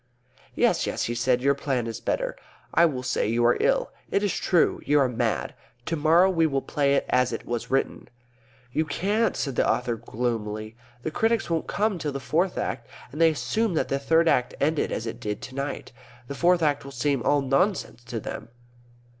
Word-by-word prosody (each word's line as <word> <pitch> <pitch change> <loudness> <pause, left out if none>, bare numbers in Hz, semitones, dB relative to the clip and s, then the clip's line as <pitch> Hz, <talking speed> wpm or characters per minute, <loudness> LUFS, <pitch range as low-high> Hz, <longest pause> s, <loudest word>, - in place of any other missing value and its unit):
"Yes, - - +2
yes," - - -2
he 120 - -1
said. 125 +1 +1
"Your 140 +1 +4
plan 135 -3 -2
is 115 -1 -5
better. - - -1 0.4
I 170 +1 +6
will 130 -5 -4
say 130 - 0
you 120 +2 +1
are 120 - +5
ill. - - +1 0.2
It 200 - +1
is 205 - +1
true; 175 -3 +2
you 145 +1 +3
are 135 - +4
mad. 125 -2 -1 0.3
To 165 - -1
morrow 165 +4 +5
we 165 -4 +2
will 135 -3 -1
play 140 -2 +1
it - - +1
as 125 0 +2
it - - -5
was 120 -1 -3
written." 135 +1 -1 0.6
"You 155 - +1
can't," 205 +9 0
said 135 -4 -2
the - - +3
author 120 -2 0
gloomily. 110 -2 -3 0.3
"The 155 - -2
critics 225 0 0
won't 165 -1 -1
come 210 -3 0
till 150 -3 -3
the 140 - -3
Fourth 160 +9 0
Act 115 -2 -3 0.2
and 155 - -4
they'll 165 -1 +6
assume 215 +5 -1
that - - 0
the 140 - 0
Third 165 +4 +3
Act 125 -5 +2
ended 150 +2 +1
as 115 - -3
it 115 - -5
did 105 -1 -4
tonight. 140 +2 -5 0.4
The 140 - -5
Fourth 175 +3 +3
Act 145 -2 +1
will 140 - -9
seem 135 0 0
all 145 +5 +2
nonsense 135 - 0
to 120 -1 -4
them." 110 - -7
140 Hz, 205 wpm, -25 LUFS, 125-165 Hz, 0.6 s, I